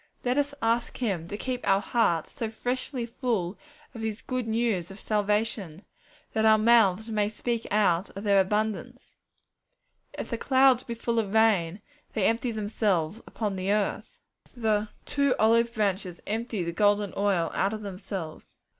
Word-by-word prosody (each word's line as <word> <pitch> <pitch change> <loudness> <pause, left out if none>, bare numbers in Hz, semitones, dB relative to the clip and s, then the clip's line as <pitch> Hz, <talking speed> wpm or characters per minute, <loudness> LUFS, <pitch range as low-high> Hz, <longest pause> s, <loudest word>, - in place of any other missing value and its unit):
Let 250 +3 +2
us 285 0 -1
ask 230 +1 0
Him 190 -9 -2
to 205 - -5
keep 250 +2 -3
our 195 0 +5
hearts 200 -7 +1
so 225 - -4
freshly 245 +2 -3
full 225 -6 -2 0.4
of 230 - -8
His 220 -1 -4
good 255 -2 -3
news 220 -6 0
of 195 +1 -10
salvation, 210 -4 -1 0.5
that 220 - +1
our 220 0 +6
mouths 220 -1 +4
may 210 -1 +1
speak 230 +2 -3
out 195 -3 +2
of 200 - -5
their 200 -2 +5
abundance. 210 +1 -2 1.0
'If - - -5
the 230 - -2
clouds 260 -1 +4
be 235 - -5
full 230 0 -1
of 210 -1 -2
rain, 205 -4 +3 0.3
they 210 -4 +1
empty 230 +2 +1
themselves 205 -4 -1
upon 210 -3 -3
the 190 +1 -1
earth.' 210 -1 -1 0.4
The 215 -2 +1 0.2
'two 280 -2 +1
olive 230 +1 +4
branches 195 -5 -1
empty 220 -2 -2
the 170 - -2
golden 205 +1 +2
oil 195 -5 +1
out 195 - +1
of 215 -1 -5
themselves.' 190 -4 -7
215 Hz, 160 wpm, -27 LUFS, 195-230 Hz, 1.0 s, our